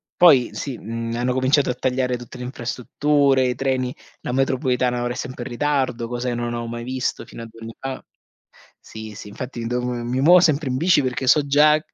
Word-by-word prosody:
poi 140 -9 +6
sì, 135 -4 -5
mhmm, 115 +1 -4
hanno 125 +1 0
cominciato 130 +2 +2
a - - +1
tagliare 125 0 0
tutte 120 +1 -11
le 125 - -6
infrastrutture, 135 +2 +1
i 125 - -1
treni, 130 -1 -1 0.3
la - - -4
metropolitana 125 -1 +1
ora 120 - -1
è - - -9
sempre 130 -1 -5
in - - -7
ritardo, 130 -3 0
cosa 120 +1 -3
che 120 - -2
non 120 0 -3
avevo 120 0 -4
mai 120 0 -5
visto 130 0 -3
fino - - -10
a - - -6
2 115 0 -16
anni 115 0 -8
fa 135 -1 -6 0.8
Sì, 110 -1 -9
sì, 105 - -9
infatti 120 +2 -6
devo 125 +1 -1
mi 120 +1 -2
muovo 175 +6 +7
sempre 155 -4 +2
in 130 - -1
bici 170 +3 +4
perché 130 0 -2
so 145 +3 +4
già 150 +2 +5
125 Hz, 210 wpm, -22 LUFS, 120-135 Hz, 0.8 s, muovo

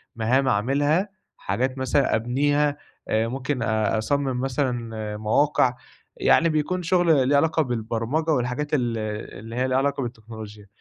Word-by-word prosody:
مهام 125 +4 +1
اعملها، 145 - +1 0.3
حاجات 130 +2 -2
مثلًا 130 0 +1
أبنيها، 145 +5 +1 0.3
أ 110 +1 +1
ممكن 130 +1 -2
أصمِّم 115 +5 0
مثلًا 120 -6 -2
مواقع، 125 +4 +2 0.4
يعني 165 - +4
بيكون 160 +4 -1
شغل 165 -6 +3
ليه 145 - +3
علاقة 160 +2 +2
بالبرمجة 120 +6 -1
والحاجات 130 +3 -1
ال 120 -5 +1 0.4
اللي 115 +2 -8
هي 130 +1 0
ليها 130 - +1
علاقة 140 +1 0
بالتكنولوجيا، 110 -3 -9
130 Hz, 130 wpm, -24 LUFS, 115-145 Hz, 0.4 s, يعني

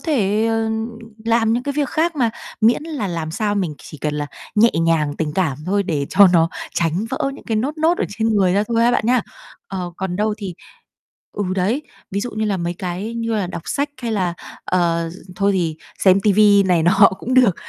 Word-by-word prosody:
thể, 220 - +1
ờ, 225 0 0 0.5
làm 230 -1 +2
những 240 - 0
cái 285 +2 -2
việc 290 -3 +1
khác 325 0 0
mà, 235 -4 +2 0.3
miễn 230 +6 +4
là 305 -10 -4
làm 165 -3 -3
sao 205 +4 -1
mình 180 -7 -1
chỉ 150 - -11
cần 150 +2 -2
là 145 0 -2 0.3
nhẹ 225 +2 +5
nhàng, 155 -3 +1
tình 155 -2 -2
cảm 160 -8 0
thôi, 200 +2 +1
để 150 -7 -2
cho 200 +1 +7
nó 165 -2 +4 0.3
tránh 170 +4 0
vỡ 275 - -1
những - - -13
cái 225 - -1
nốt 280 +8 -2
nốt 330 +3 +2
ở - - +1
trên 220 +2 -1
người 185 -2 +3
ra 200 - +3
thôi 230 -1 +2
ha 235 - +4
bạn 245 - 0
nhá. 250 +1 +4 0.5
Ờ, 185 -2 -4
còn 185 -1 -3
đâu 210 +1 0
thì 195 -4 -5 0.8
ừ, 205 - -2
đấy, 205 +10 0 0.3
ví 200 - -1
dụ 245 +3 -4
như 215 +1 -2
là 205 -2 0
mấy 175 0 -3
cái 185 +5 -4
như 230 -1 -2
là 205 -4 0
đọc 175 -2 -6
sách, 285 +1 -1
hay 230 - -2
là, 185 -5 0 0.3
ờ, 170 -2 0 0.3
thôi 200 0 +2
thì 170 -4 -1 0.2
xem 190 0 +5
ti 205 +1 +3
vi 205 0 +6
này 180 -4 +2
nọ 195 +4 +6
cũng 255 - -2
được, 250 -8 +5
200 Hz, 225 wpm, -20 LUFS, 175-230 Hz, 0.8 s, cho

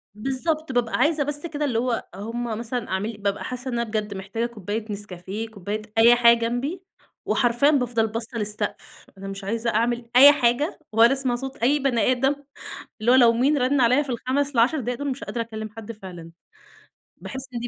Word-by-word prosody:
بالضبط، 270 +6 -2
بابقى 245 -2 0
عايزة 300 -1 +2
بس 295 +3 -4
كده 300 -2 -3
اللي 235 -5 0
هو 240 -2 -2
هُم 230 +4 -5 0.2
مثلًا 240 0 -4
أعمل 210 +3 -3
بابقى 200 0 -2
حاسة 255 +1 -5
إن - - -4
أنا - - +1
بجد 215 -2 -3
محتاجة 200 +5 -3
كوباية 215 -1 -5
نسكافيه، 200 +2 -6
كوباية 205 +1 -5 0.2
أي 235 +2 +7
حاجة 235 -1 +6
جنبي 255 +10 -2 0.4
وحرفيًا 245 +4 +3
بافضَل 240 -5 +1
باصة 230 +2 -5
للسقف، 210 0 -4
أنا 195 +1 -8
مش 195 0 -7
عايزة 230 +3 -2
أعمل 235 +1 0
أي 280 +3 +10
حاجة 275 +3 +1
ولا 230 +4 +5
أسمَع 260 -3 0
صوت 270 +2 -6
أي 280 +5 +2
بني 255 -3 +2
أدم 270 +3 +1 0.7
اللي 240 +3 +3
هو - - +7
لو 235 -3 +6
مين 275 +5 +2
رَن 260 +1 +2
عليّا 250 +5 +4
في 275 - -11
ال5 265 +4 -1
ال10 250 +6 +3
دول، 250 +3 -3
مش 260 - -6
قادرة 235 - -4
أكلّم 220 -1 -6
حد 225 +1 -9
فعلًا. 180 -6 -10 0.9
باحس 265 0 -7
إن 235 - -3
دي 240 - -4
235 Hz, 190 wpm, -24 LUFS, 220-265 Hz, 0.9 s, أي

